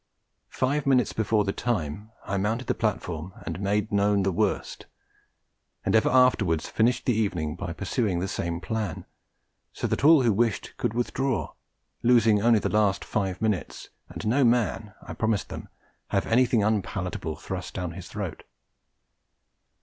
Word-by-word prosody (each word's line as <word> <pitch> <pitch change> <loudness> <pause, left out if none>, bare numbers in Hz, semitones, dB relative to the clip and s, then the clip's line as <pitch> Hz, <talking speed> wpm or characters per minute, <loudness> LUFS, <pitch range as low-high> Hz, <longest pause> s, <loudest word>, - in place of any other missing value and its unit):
Five 140 +2 -1
minutes 130 -2 +3
before 110 -1 +1
the 100 - -1
time, 105 -3 -2 0.2
I 100 - -2
mounted 110 +6 -1
the - - 0
platform 90 -5 -3
and - - -4
made 105 +2 0
known 100 -1 +2
the 95 - +1
worst; 105 +4 -2 1.0
and - - +2
ever 110 - +4
afterwards 110 -11 +3
finished 120 +3 +1
the 125 - +3
evening 90 -8 -1
by 90 -1 -5
pursuing 100 +2 -1
the 90 +3 -1
same 85 -2 -3
plan, 110 -6 -3 0.7
so - - -4
that - - -1
all 155 -2 +7
who 115 -3 +3
wished 115 0 0
could 110 - -2
withdraw, 120 - -1 0.5
losing 115 -4 +4
only 115 +1 +5
the - - 0
last 105 -2 +1
five 95 -2 -2
minutes, 105 -4 -2 0.2
and - - -7
no 130 +6 +3
man 115 -3 +1
(I - - -7
promised 110 -3 -1
them) - - -8 0.4
have - - 0
anything 120 -2 +3
unpalatable 95 -6 -2
thrust 90 +3 -6
down 90 -2 -3
his 85 +1 -9
throat. - - -5
105 Hz, 155 wpm, -26 LUFS, 95-115 Hz, 1.0 s, all